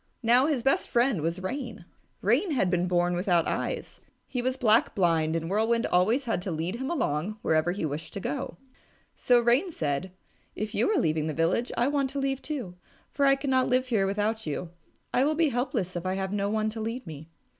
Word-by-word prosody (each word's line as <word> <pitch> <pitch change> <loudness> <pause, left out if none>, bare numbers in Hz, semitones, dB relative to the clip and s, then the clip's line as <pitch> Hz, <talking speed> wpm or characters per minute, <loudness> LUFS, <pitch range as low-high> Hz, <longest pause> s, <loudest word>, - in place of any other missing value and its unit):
Now 245 +4 +5
his 280 -7 0
best 270 +1 +2
friend 240 - +2
was 170 +4 -2
Rain. 230 -3 -5 0.4
Rain 255 - +2
had 190 -9 +1
been 180 0 +1
born 175 0 +2
without 175 -2 +2
eyes. - - -3 0.2
He 250 - -3
was 255 +1 -1
black 225 -3 +3
blind, 165 -4 +2
and 165 0 -2
Whirlwind 225 +5 +1
always 220 +10 +2
had 225 -6 -1
to 190 - -5
lead 170 +5 -2
him 265 +3 -4
along 210 - -1
wherever 160 +2 +2
he 180 -2 -3
wished 155 +2 -5
to - - -4
go. 165 0 -4 0.6
So 245 -1 +3
Rain 245 +10 +2
said, 155 - -2 0.4
"If 215 +1 -4
you - - +1
are 425 - +2
leaving 155 -1 0
the 155 - -3
village, 170 +9 +1
I 240 - +3
want 280 -2 +1
to 280 +1 -4
leave 270 -1 -1
it - - -29
too, 265 - -4 0.4
for 280 -1 +2
I 275 - +6
cannot 265 -2 +1
live 255 0 +1
here 205 -5 +2
without 210 +1 -1
you. 165 +3 -4 0.4
I 255 - +3
will 305 +2 +2
be 325 -1 +3
helpless 245 -7 -2
if 175 - -3
I 185 0 -1
have 190 0 -3
no 200 0 0
one 215 0 0
to 220 0 -6
lead 230 +4 -4
me." 155 -1 -9
215 Hz, 215 wpm, -27 LUFS, 175-255 Hz, 0.6 s, I